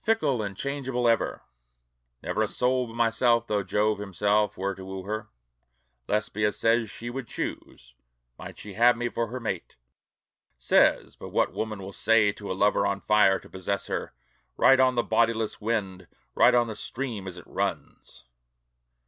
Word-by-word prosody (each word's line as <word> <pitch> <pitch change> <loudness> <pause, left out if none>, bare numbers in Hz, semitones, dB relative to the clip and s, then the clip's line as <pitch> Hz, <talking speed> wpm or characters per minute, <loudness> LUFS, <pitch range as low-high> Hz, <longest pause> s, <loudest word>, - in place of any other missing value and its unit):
"FICKLE 150 - +1
AND 100 -2 -5
CHANGEABLE 130 -3 -2
EVER" 115 -1 +1 0.8
Never - - -1
a - - +2
soul 125 0 0
but 115 - -11
myself, 115 0 +2
though 105 -3 0
Jove 105 +2 0
himself 105 +1 0
were 100 +1 -2
to 95 - -10
woo 95 0 -7
her, 110 +2 -4 0.8
Lesbia 105 0 0
says 115 -1 +1
she 120 +3 -7
would 130 -1 -6
choose, 60 - -6 0.4
might - - -10
she 105 - -9
have 120 +3 +4
me 120 0 -1
for 115 0 -2
her 130 +2 -6
mate. 100 -7 -5 0.8
Says 60 - +3
but - - -9
what - - +1
woman 110 -1 -3
will 95 +1 -8
say 110 -1 +3
to 100 -1 -8
a 95 - -3
lover 105 +1 +3
on 100 - -1
fire 105 -2 +4
to - - -15
possess 95 +1 -3
her, - - -4 0.4
Write 135 0 +6
on 130 -1 +4
the 120 - +2
bodiless 115 -2 0
wind, 105 -4 -2 0.3
write - - +5
on 120 -1 +4
the 110 -2 -6
stream 115 -3 -5
as 90 -1 -7
it 90 - -11
runs. 60 - -5
110 Hz, 170 wpm, -26 LUFS, 100-120 Hz, 0.8 s, Write